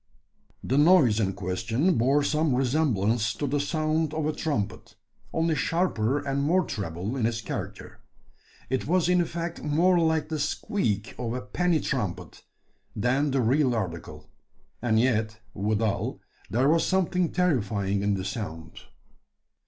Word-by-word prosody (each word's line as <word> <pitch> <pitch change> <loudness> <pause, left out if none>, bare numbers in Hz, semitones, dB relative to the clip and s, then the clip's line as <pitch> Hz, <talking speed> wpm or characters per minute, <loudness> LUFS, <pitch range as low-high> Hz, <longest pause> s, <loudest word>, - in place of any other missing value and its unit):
The 135 +3 +1
noise 145 - +5
in 95 -3 0
question 115 - 0
bore 135 +5 +3
some 150 -2 +1
resemblance 120 -6 +1
to 145 - -3
the 145 +1 0
sound 155 +1 0
of 155 -1 -1
a 155 - 0
trumpet, 115 -7 -3 0.4
only 165 0 +1
sharper 145 -5 0
and 140 -1 -2
more 175 +6 +3
treble 95 +4 -4
in 120 -4 +1
its 115 -1 -2
character. 105 - -6 0.7
It 130 +1 -2
was 175 +1 +2
in 180 0 +4
effect 170 0 -4
more 170 +5 +3
like 160 -2 +1
the 155 -1 -2
squeak 110 - -1
of 120 -2 -2
a 125 - -3
penny 165 +10 0
trumpet 120 -13 -4 0.5
than 130 +7 +1
the 135 -1 +1
real 130 +2 +2
article; 90 -7 -5 0.5
and 110 -2 +2
yet, 110 -3 +1
withal, 105 +1 -1 0.3
there 125 +5 +2
was 165 +2 +3
something 180 -2 +1
terrifying 105 - 0
in 100 0 +1
the 95 -1 -4
sound. 85 -6 -6
130 Hz, 145 wpm, -26 LUFS, 110-160 Hz, 0.7 s, noise